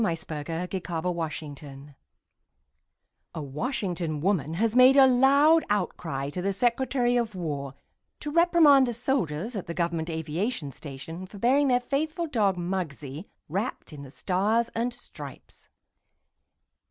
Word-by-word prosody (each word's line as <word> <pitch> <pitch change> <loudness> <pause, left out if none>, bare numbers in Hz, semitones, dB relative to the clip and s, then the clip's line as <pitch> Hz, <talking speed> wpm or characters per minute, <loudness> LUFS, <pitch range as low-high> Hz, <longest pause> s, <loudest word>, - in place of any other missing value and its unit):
THE 175 -7 +1
FLAG 155 -2 -6
AND 165 +2 -2
THE 190 - -1
FAITHFUL 155 -5 -5 1.4
(A 160 - -4
Washington 170 - -3
woman 165 -3 0
has 220 +4 0
made 255 +1 +7
a 270 - +9
loud 280 +5 +5
outcry 165 -8 -2
to 180 - -4
the 195 +2 0
Secretary 245 +3 +1
of 230 -4 -1
War 145 -6 -4 0.4
to 295 - -5
reprimand 320 -5 +6
the 240 - -2
soldiers 230 - -1
at 195 - -5
the 170 - -5
Government 170 -1 -1
Aviation 160 - -3
Station 160 +7 -8
for 200 - -12
burying 265 +7 +3
their 250 -2 +3
faithful 310 +6 -2
dog, 210 - +1
Muggsie, 170 -4 -4 0.2
wrapped 195 - -4
in 145 - -9
the 140 - -10
Stars 205 - 0
and 235 +2 -1
Stripes.) - - -12
185 Hz, 140 wpm, -27 LUFS, 160-245 Hz, 1.4 s, a